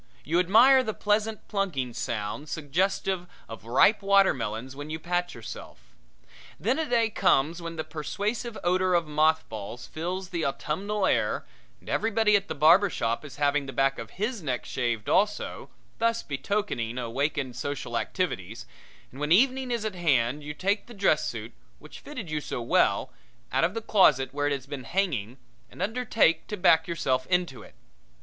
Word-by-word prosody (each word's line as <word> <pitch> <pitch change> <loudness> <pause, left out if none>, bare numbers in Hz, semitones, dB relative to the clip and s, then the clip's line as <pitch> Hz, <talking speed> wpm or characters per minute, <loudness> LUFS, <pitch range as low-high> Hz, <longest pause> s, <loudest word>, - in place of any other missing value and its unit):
You 165 +6 +1
admire 235 +9 +6
the 215 -3 -3
pleasant 215 +1 0
plunking 160 - -2
sound 115 +7 -4
suggestive 180 +4 -1 0.2
of 115 -3 -10
ripe 130 - +4
watermelons 130 - +2
when 145 +2 -7
you 155 - -3
pat 175 +2 -2
yourself. - - -10 0.7
Then 265 - 0
a 315 -3 -2
day 230 -2 +2
comes 165 -1 +2
when 165 0 -6
the 155 - -3
persuasive 205 - -4
odor 185 +1 +2
of 170 -1 +2
mothballs 150 -7 0
fills 180 +3 -4
the 170 -3 -2
autumnal 190 +9 -1
air - - +1 0.3
and - - -22
everybody 220 -1 +2
at 200 0 +1
the - - -4
barber 170 +7 +6
shop 115 -5 -2
is 145 -4 -10
having 145 0 +1
the 135 - -6
back 135 0 +1
of - - -9
his 220 +1 -1
neck 130 -6 -3
shaved 120 -4 -2
also, 210 +2 0 0.3
thus 230 0 +1
betokening 140 - -2
awakened 130 +2 -2
social 130 -2 -4
activities, 115 - -3 0.5
and 135 - -12
when 150 +1 -2
evening 260 +6 +4
is 235 -3 -2
at 215 - -2
hand 145 -5 +1
you 150 +1 -6
take 200 +6 -1
the 240 - -11
dress 195 -1 +2
suit, - - -6 0.2
which - - -13
fitted 255 - -7
you 155 -1 -2
so - - -4
well, 120 - +1 0.4
out - - +2
of 180 +6 +1
the 225 - -2
closet 140 -13 +4
where 145 0 0
it - - 0
has 135 -2 -4
been 140 -2 -7
hanging 135 - -1 0.3
and - - -15
undertake 225 -7 +1
to 210 - -4
back 160 -3 +4
yourself 130 -6 -1
into 180 -8 0
it. - - -15
165 Hz, 170 wpm, -27 LUFS, 135-200 Hz, 0.7 s, admire